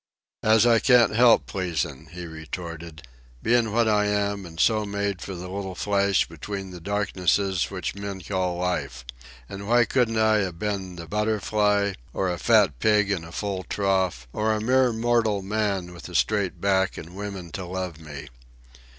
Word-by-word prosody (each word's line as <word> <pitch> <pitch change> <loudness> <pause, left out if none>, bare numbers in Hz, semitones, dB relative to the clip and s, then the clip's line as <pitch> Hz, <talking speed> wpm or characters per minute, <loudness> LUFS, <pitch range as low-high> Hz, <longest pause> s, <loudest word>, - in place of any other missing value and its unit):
"As 110 +1 +5
I 115 -1 +5
can't 120 -3 +5
help 120 0 +6
pleasin'," 85 -6 -3
he 90 +1 -8
retorted, 80 0 -8 0.4
"bein' 115 -1 +2
what 115 +1 +2
I 105 -1 +3
am 100 -2 -1
an' 80 -1 -12
so 110 +4 +3
made 100 -2 -2
for 95 - -6
the 90 +1 -7
little 95 0 -5
flash 100 0 +1
between 95 +4 -6
the 90 - -9
darknesses 95 -1 0
which 95 -2 -4
men 100 -1 -6
call 90 -1 -2
life. 90 -9 -2 0.4
Now 100 0 -7
why 120 +1 +4
couldn't 115 -1 +1
I 110 0 +4
a 95 -3 0
ben 95 0 -4
a 85 - -6
butterfly, 105 0 +1 0.2
or 95 -2 0
a 85 - -6
fat 105 - +3
pig 105 +1 +3
in 90 -5 -1
a 80 - -10
full 95 0 -3
trough, 95 -10 0
or 110 +1 +1
a 110 - -1
mere 125 +3 +3
mortal 115 -3 +1
man 100 -3 -1
with 85 - -10
a 90 - -9
straight 100 +2 +1
back 95 -2 +1
an' 85 +2 -9
women 95 -3 -6
to 95 +3 -5
love 90 -3 -4
me? 75 -2 -9
100 Hz, 175 wpm, -25 LUFS, 90-105 Hz, 0.4 s, help